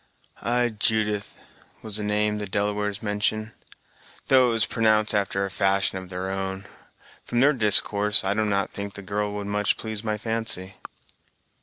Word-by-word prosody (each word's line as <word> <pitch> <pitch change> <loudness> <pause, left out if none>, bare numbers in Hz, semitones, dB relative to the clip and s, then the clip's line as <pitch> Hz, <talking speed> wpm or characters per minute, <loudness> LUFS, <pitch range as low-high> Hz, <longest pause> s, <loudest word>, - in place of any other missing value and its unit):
"Ay, 120 0 +1
Judith 105 -1 0 0.5
was 110 -2 -1
the 105 - -3
name 105 0 0
the 105 - -4
Delawares 105 +1 -2
mentioned, 110 +1 -1 0.8
though 130 -1 +6
it - - 0
was 115 - +2
pronounced 110 -2 +2
after 100 -1 0
a 100 - -6
fashion 95 0 +1
of 95 -1 -11
their 95 +1 -4
own. 95 0 -4 0.6
From 120 - -2
their 145 +4 +5
discourse, 105 -3 +4
I 95 +1 0
do 110 +1 0
not 100 -2 -1
think 100 0 -6
the 100 - -7
girl 105 +1 -2
would 105 0 -5
much 105 0 0
please 110 -1 -5
my 110 -1 -2
fancy." 110 -4 -2
105 Hz, 165 wpm, -25 LUFS, 100-110 Hz, 0.8 s, though